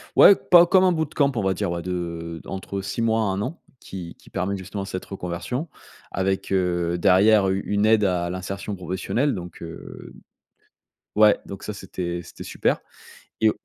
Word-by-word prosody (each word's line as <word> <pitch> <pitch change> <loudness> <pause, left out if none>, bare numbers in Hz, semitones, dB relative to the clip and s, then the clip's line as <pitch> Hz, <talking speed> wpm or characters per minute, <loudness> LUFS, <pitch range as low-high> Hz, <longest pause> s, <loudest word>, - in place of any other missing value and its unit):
ouais, - - +9
pas 175 -1 +6
comme 185 +2 +4
un 185 - +5
bootcamp, 150 -3 +1
on 115 - 0
va 95 0 +2
dire, 100 0 -2
ouais, 85 0 -3
de 85 -2 -4
entre 95 0 -5
6 100 +4 -3
mois 115 0 +2
à - - +2
1 95 0 -1
an, 170 - -5 0.2
qui 90 -3 -8
qui - - -20
permet 95 +1 -1
justement 100 +2 -5
cette 95 -1 -5
reconversion 95 - -4 0.4
avec, 95 +1 -1
heu, 90 -2 +1
derrière 100 +3 +5
u 95 +1 0
une 105 0 +1
aide 110 -1 +4
à 90 -2 0
l'insertion 95 +3 -5
professionnelle, 95 +9 -1
donc, 90 -2 -8
heu 85 0 -9 1.0
ouais, 105 -1 +6
donc, 100 - -8
ça, 105 - -4
c'était 90 -3 -5
c'était - - -11
super. - - 0 0.6
Et 110 - +5
95 Hz, 175 wpm, -24 LUFS, 90-105 Hz, 1.0 s, ouais